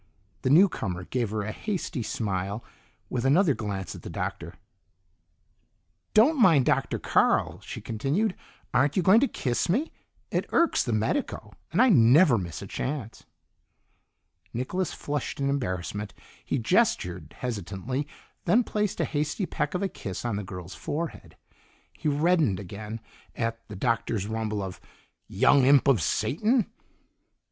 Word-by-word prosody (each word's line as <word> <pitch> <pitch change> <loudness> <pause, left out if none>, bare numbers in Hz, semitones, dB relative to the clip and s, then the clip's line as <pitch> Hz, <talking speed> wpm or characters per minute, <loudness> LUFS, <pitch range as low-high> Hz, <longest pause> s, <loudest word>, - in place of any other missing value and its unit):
The - - 0
newcomer 130 - +3
gave 120 +3 -2
her 105 0 -2
a 105 - -3
hasty 180 - -3
smile, 105 -2 -3 0.4
with 120 -2 -2
another 150 +4 +4
glance 100 -7 -4
at - - -10
the - - -8
Doctor. - - -4 1.6
"Don't 255 +6 +5
mind 160 - +6
Dr. - - +1
Carl," - - +2
she - - -8
continued. 145 - 0 0.4
"Aren't 145 +6 +2
you 185 - +3
going 190 +6 +7
to 275 - +3
kiss 125 - -1
me? 265 - +1 0.4
It - - -1
irks 335 - +3
the 120 - -2
medico, 110 - -1 0.2
and - - 0
I 255 - +6
never 130 - +6
miss 85 -4 -6
a - - -6
chance." 130 -6 -5 1.3
Nicholas 175 +10 -2
flushed 145 -1 -4
in 140 0 +1
embarrassment; 100 -5 -3 0.3
he - - -1
gestured 90 -2 +1
hesitantly, 120 - -3 0.4
then 225 +8 +4
placed 210 -2 -2
a - - +2
hasty 155 +6 -1
peck 150 - -2
of 180 - -1
a - - +2
kiss 100 - -6
on 120 -3 -1
the 105 - -3
girl's 90 -1 -8
forehead. 160 +3 -5 0.6
He - - -4
reddened 150 - +2
again 105 +3 -7 0.3
at 115 0 -2
the 105 - -8
Doctor's 115 -1 0
rumble 110 -1 -2
of 95 -2 -7 0.5
"Young 140 -2 +4
imp 140 +1 +5
of 135 -6 +4
Satan!" 210 - +1
125 Hz, 145 wpm, -27 LUFS, 105-170 Hz, 1.6 s, going